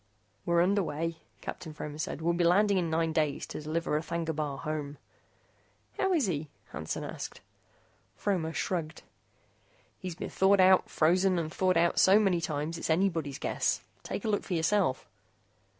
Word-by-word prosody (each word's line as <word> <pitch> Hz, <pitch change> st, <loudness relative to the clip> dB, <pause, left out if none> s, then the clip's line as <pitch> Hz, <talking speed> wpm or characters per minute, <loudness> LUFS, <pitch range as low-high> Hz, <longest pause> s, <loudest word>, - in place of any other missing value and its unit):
"We're 170 Hz, 0 st, +4 dB
underway," 165 Hz, -4 st, 0 dB, 0.2 s
Captain 160 Hz, -3 st, -7 dB
Fromer 150 Hz, 0 st, -6 dB
said. 155 Hz, 0 st, -4 dB
"We'll 170 Hz, +1 st, +2 dB
be 175 Hz, +1 st, +1 dB
landing 195 Hz, +3 st, +4 dB
in 170 Hz, -2 st, -1 dB
nine 160 Hz, 0 st, 0 dB
days 150 Hz, -3 st, 0 dB
to -, -, -7 dB
deliver 155 Hz, 0 st, -1 dB
R'thagna 165 Hz, 0 st, -3 dB
Bar 145 Hz, -3 st, -2 dB
home." 150 Hz, -1 st, -4 dB, 1.0 s
"How 385 Hz, -, +2 dB
is 310 Hz, -8 st, +3 dB
he?" 155 Hz, -5 st, -2 dB, 0.2 s
Hansen 75 Hz, +2 st, -4 dB
asked. -, -, -6 dB, 0.8 s
Fromer 180 Hz, -6 st, -1 dB
shrugged. 165 Hz, -2 st, -3 dB, 1.0 s
"He's 180 Hz, -3 st, -5 dB
been -, -, -6 dB
thawed 195 Hz, +1 st, +4 dB
out, 185 Hz, 0 st, +5 dB
frozen, 180 Hz, +3 st, +3 dB
and 165 Hz, -1 st, -2 dB
thawed 185 Hz, -2 st, +2 dB
out 170 Hz, +1 st, +3 dB
so 190 Hz, +2 st, +7 dB
many 190 Hz, -5 st, +2 dB
times, 160 Hz, +1 st, -3 dB
it's -, -, -4 dB
anybody's 160 Hz, -5 st, +1 dB
guess. -, -, 0 dB, 0.2 s
Take -, -, -5 dB
a -, -, 0 dB
look 205 Hz, -2 st, +1 dB
for 180 Hz, -, -3 dB
yourself." 165 Hz, -4 st, +1 dB
165 Hz, 160 wpm, -30 LUFS, 155-185 Hz, 1.0 s, so